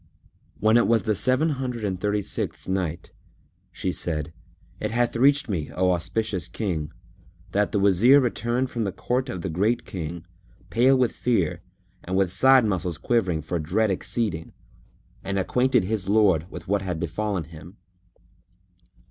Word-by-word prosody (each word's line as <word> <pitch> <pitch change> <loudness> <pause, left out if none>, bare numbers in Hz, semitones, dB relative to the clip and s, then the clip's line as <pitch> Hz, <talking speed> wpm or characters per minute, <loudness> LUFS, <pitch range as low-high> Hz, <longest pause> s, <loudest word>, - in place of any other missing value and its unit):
When 110 +2 +4
it 120 - +3
was 115 -3 +3
the 110 - +1
Seven 130 +9 +2
Hundred 130 -5 -3
and 95 -2 -3
Thirty 105 0 0
sixth - - -4
Night, 90 -4 -3 0.6
She 90 +1 -3
said, 80 -3 -3 0.5
It 105 - -2
hath 120 +2 0
reached 140 +4 +4
me, 85 -9 -3
O 90 0 +2
auspicious 90 +1 -2
King, 85 -9 -3 0.6
that 105 0 +1
the - - 0
Wazir 100 +8 +5
returned 125 0 -1
from 115 - -2
the 100 - -2
court 125 +7 -2
of 90 -7 -5
the - - -2
Great 105 +8 0
King, 85 -2 -6 0.5
pale 130 +3 +4
with 125 -2 +2
fear 90 -8 0 0.4
and 95 +1 -2
with 95 -2 +1
side 130 -2 +6
muscles 90 -5 -1
quivering 95 -10 0
for 85 +3 -2
dread 95 +7 +1
exceeding; 95 -3 -2 0.7
and 100 0 -2
acquainted 125 +4 +2
his 100 -1 -2
lord 95 -6 +3
with - - -9
that 100 0 0
had 90 -4 -3
befallen 90 +2 -2
him. 80 +5 -13
100 Hz, 155 wpm, -24 LUFS, 90-120 Hz, 0.7 s, side